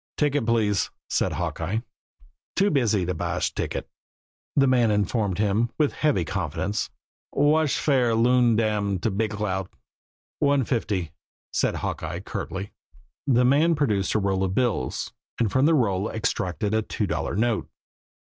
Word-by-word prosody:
"Ticket, 145 -5 +1
please," 105 -4 +2 0.2
said - - +1
Hawkeye. 95 +8 -2 0.7
"Too 200 +1 +3
busy 110 -9 +2
to 90 - -1
buysh 80 - -2
ticket," - - -3 0.7
the 140 - +5
man 125 -3 +4
informed 105 -1 0
him, 105 +3 +1
with 150 -2 +2
heavy 145 - +1
confidence. 95 +3 -2 0.4
"Whash 150 +1 +3
fare 125 -6 +2
Loon 120 0 +4
Dam 105 -3 +1
to 105 +5 -1
Big 105 +3 0
Cloud?" 95 -3 -2 0.7
"One 140 -1 +3
fifty," 100 - -1 0.4
said - - +1
Hawkeye - - -4
curtly. 95 +1 -5 0.6
The 125 -2 +4
man 155 +6 +4
produced 105 -11 0
a - - +4
roll 95 -1 0
of 95 0 -1
bills, 115 - -1 0.3
and 110 -4 +1
from 130 +3 +3
the 165 - +4
roll 105 -6 +1
extracted 105 -2 -1
a 110 - +3
two - - -2
dollar - - -2
note. 115 +1 0
110 Hz, 145 wpm, -25 LUFS, 100-130 Hz, 0.7 s, the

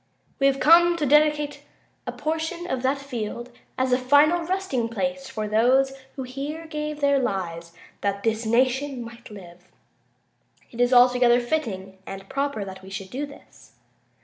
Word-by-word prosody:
We 275 - +4
have 275 0 +1
come 340 +2 +6
to 305 - 0
dedicate 295 +1 +2 0.5
a - - -1
portion 320 +2 -3
of 260 -8 -2
that 265 +2 +1
field 240 -3 -6 0.3
as 260 -1 +1
a 250 - +3
final 290 +6 +4
resting 330 -10 -1
place 270 +3 -3
for 215 -5 -4
those 255 +5 +3 0.2
who 265 - -4
here 280 +6 -6
gave 300 -1 -5
their 280 -1 +3
lives 170 -8 -3 0.3
that 200 0 -2
this 225 0 0
nation 255 +3 +1
might 235 +1 -12
live. 180 -3 -13 1.0
It 240 - -4
is 245 +1 +3
altogether 245 -1 +5
fitting 205 -8 -3
and 195 0 -8
proper 275 -7 -2
that 190 -1 -9
we 190 - -12
should 190 0 -7
do 285 +3 -3
this. 285 - -17
260 Hz, 160 wpm, -24 LUFS, 220-290 Hz, 1.0 s, come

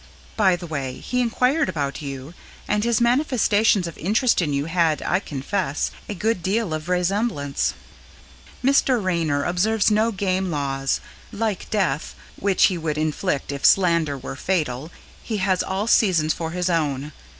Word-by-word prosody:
(By 190 -4 +4
the 175 0 -8
way, 140 -5 -4
he 250 0 -1
inquired 250 +6 +1
about 140 -1 -3
you, 140 +1 -7 0.3
and 210 0 +1
his 235 -1 +2
manifestations 235 - +3
of 170 - -6
interest 220 - +2
in 155 -4 -1
you 140 0 -1
had, 165 -2 +1
I 185 - +1
confess, 150 -1 -2 0.2
a 205 - -3
good 215 +1 0
deal 195 -1 0
of 155 +1 -4
vraisemblance.) 180 -5 0 0.9
Mr. 265 -1 +3
Raynor 165 -7 0
observes 210 +5 +2
no 220 +2 +3
game 190 -2 -1
laws; 135 -3 -1 0.3
like 215 -3 -3
Death 190 -7 -1 0.2
(which 195 -1 +1
he 185 -3 +4
would 155 -2 -2
inflict 155 -1 -1
if 140 -1 -6
slander 170 -6 +4
were 135 +1 -7
fatal) 150 -4 -2 0.3
he 220 - -3
has 190 -2 +1
all 190 +2 -2
seasons 175 -9 +3
for 165 -1 -4
his 180 +2 -2
own. 150 -4 -1
180 Hz, 155 wpm, -23 LUFS, 155-210 Hz, 0.9 s, By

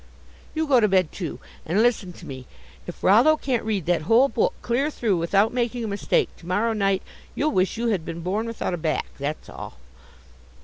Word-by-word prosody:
You 320 0 +1
go 270 -4 +5
to 215 - +4
bed, 185 -4 +2
too, 175 -5 -5 0.2
and 195 +7 +2
listen 220 -6 +1
to 170 - -13
me 130 -4 -8 0.4
if - - -9
Rollo 245 +11 +6
can't 255 -6 -1
read 210 -6 -1
that 175 -1 +1
whole 245 +5 +6
book - - 0
clear 255 +5 +1
through 220 - 0
without 200 +7 +2
making 240 -1 -1
a - - -2
mistake 200 -1 0
to 170 - -14
morrow 210 +5 +1
night, 195 -3 +1 0.3
you'll 305 +2 +1
wish 185 -2 +1
you 235 0 0
had 195 -7 0
been 165 +1 -6
born 200 +6 -1
without 230 -5 -3
a - - -1
back, 160 -2 -1
that's 145 +2 -4
all." - - -9
205 Hz, 205 wpm, -24 LUFS, 180-235 Hz, 0.4 s, Rollo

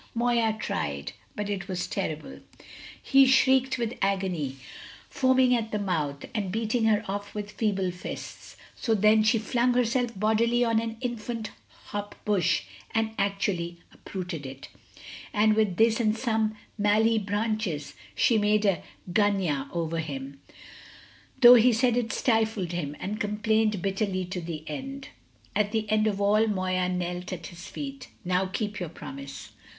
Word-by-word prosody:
Moya 235 -2 +2
tried; 70 - -3 0.2
but 210 -1 -3
it 195 -2 -3
was 185 -2 -2
terrible; 190 - -4 0.6
he 270 0 +5
shrieked 260 0 +4
with 235 -1 -2
agony, 185 -8 0 0.5
foaming 260 -1 +3
at 225 -2 -2
the 210 - 0
mouth, 155 -8 -2
and 200 -4 -2
beating 225 +2 0
her 215 -2 +3
off 200 +1 -5
with 210 0 -4
feeble 195 -5 0
fists. 180 +1 -8 0.2
So 225 -3 0
then 215 +1 +5
she 215 +2 +3
flung 240 +3 +1
herself 245 -1 +1
bodily 230 +3 +3
on 225 -1 +2
an 225 -1 -5
infant 235 -2 -4 0.4
hop 205 0 -5
bush, 200 - +2 0.3
and 225 0 0
actually 195 -4 -1 0.2
uprooted 180 -5 -6
it. 135 0 -9 0.7
And 215 +1 +5
with 215 -4 +2
this 225 0 +4
and 220 -1 +2
some 220 -3 0 0.2
mallee 220 +2 +3
branches 205 -7 -2 0.2
she 225 - +3
made 210 0 +2
a 195 -5 +2 0.3
gunyah 185 -9 +1
over 165 -1 -2
him, 140 -3 -6 1.0
though 240 -1 +11
he 245 +1 +6
said 240 +1 +2
it 240 -2 0
stifled 220 -6 +1
him, 150 -5 -3
and 210 +3 -4
complained 210 -1 +1
bitterly 195 -1 -1
to 180 0 -5
the 165 -2 -6
end. 270 - -6 0.5
At 210 0 +1
the 220 -1 -1
end 215 0 +3
of 205 -2 -1
all 210 +2 +3
Moya 185 -3 0
knelt 180 0 -3
at 170 -3 -5
his 175 +2 -9
feet. 275 -2 -7 0.2
"Now 185 +1 +1
keep 210 +2 -3
your 175 -3 -4
promise." 140 -3 -9
210 Hz, 150 wpm, -27 LUFS, 180-225 Hz, 1.0 s, though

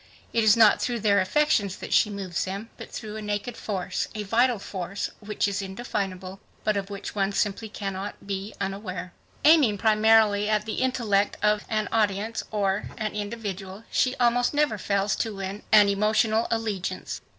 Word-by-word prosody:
It 230 - +2
is 215 0 +6
not 220 -2 +6
through 240 -2 -1
their 200 -2 +4
affections 200 -2 +2
that - - -5
she 215 - +4
moves 195 -4 -3
them, 200 +4 -6
but - - -10
through 215 -1 -6
a - - -5
naked 210 +3 -3
force, 190 -4 -3
a 210 - -3
vital 235 +4 +2
force 195 0 -5
which 210 0 -1
is 200 0 -2
indefinable 190 -2 -4 0.2
but 215 -1 +1
of 200 0 -3
which 200 0 -6
one 195 -1 0
simply 205 +2 -1
cannot 195 -1 -5
be 200 +1 -4
unaware. 185 -3 -4 0.3
Aiming 295 -10 +6
primarily 215 -1 +4
at 210 -1 +1
the 220 - -3
intellect 220 -6 +1
of 210 0 +2
an 215 -2 0
audience 215 0 0
or 200 -1 0
an 215 -2 -3
individual, 205 -2 -5
she 255 0 +2
almost 245 +2 +2
never 290 -8 +1
fails 200 +1 0
to 220 -3 -2
win 195 +2 -5
an 210 -1 +7
emotional 215 +2 +2
allegiance. 205 -5 -3
210 Hz, 170 wpm, -26 LUFS, 195-220 Hz, 0.3 s, an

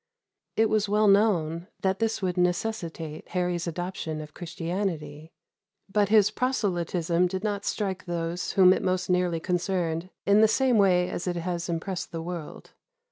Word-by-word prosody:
It 220 0 +4
was 215 -1 +1
well 210 +1 +3
known 180 -5 +3
that 190 0 0
this 225 -2 -1
would 180 -1 0
necessitate 175 -4 -2
Harry's 180 -1 -1
adoption 170 -2 -4
of 150 -1 -9
Christianity; 165 -3 -4 0.6
but 205 -1 +3
his 215 -1 +5
proselytism 180 -8 0
did 190 +2 -4
not 205 -1 -2
strike 190 -3 -2
those 170 0 -3
whom 185 -1 +7
it - - -1
most 185 0 0
nearly 180 -2 +1
concerned 180 -1 -1 0.2
in 200 +1 +5
the 220 - +7
same 250 0 +3
way 180 -3 +4
as 180 - -4
it 175 - -1
has 175 0 -3
impressed 175 +2 -3
the 165 -1 -4
world. 170 -3 -7
180 Hz, 155 wpm, -27 LUFS, 170-200 Hz, 0.6 s, whom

